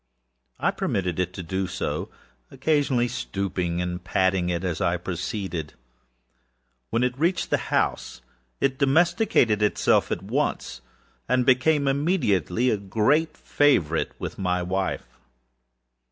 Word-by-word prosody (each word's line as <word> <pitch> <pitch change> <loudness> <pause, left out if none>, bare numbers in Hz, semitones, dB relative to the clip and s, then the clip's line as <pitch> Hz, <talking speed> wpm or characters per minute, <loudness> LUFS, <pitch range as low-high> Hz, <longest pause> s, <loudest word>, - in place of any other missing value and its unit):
I - - +2
permitted 90 -3 -2
it 90 -1 0
to 95 - -6
do 95 +3 -2
so; 95 +1 -3 0.4
occasionally 135 -3 +1
stooping 95 -7 -2
and 90 0 -4
patting 95 -1 +1
it 85 0 -2
as 90 -4 -2
I 85 +1 +1
proceeded. 90 - -4 1.1
When 115 +2 +1
it 125 0 0
reached 175 +4 0
the - - +3
house - - -1 0.4
it 135 -1 0
domesticated 150 - +3
itself 105 - +2
at - - -2
once, 60 - -2 0.5
and 125 -1 +2
became 140 +3 +3
immediately 130 - +1
a 110 - +1
great 110 +11 +1
favorite 85 - +1
with - - -6
my 90 -1 0
wife. 95 +1 -2
100 Hz, 125 wpm, -25 LUFS, 90-135 Hz, 1.1 s, the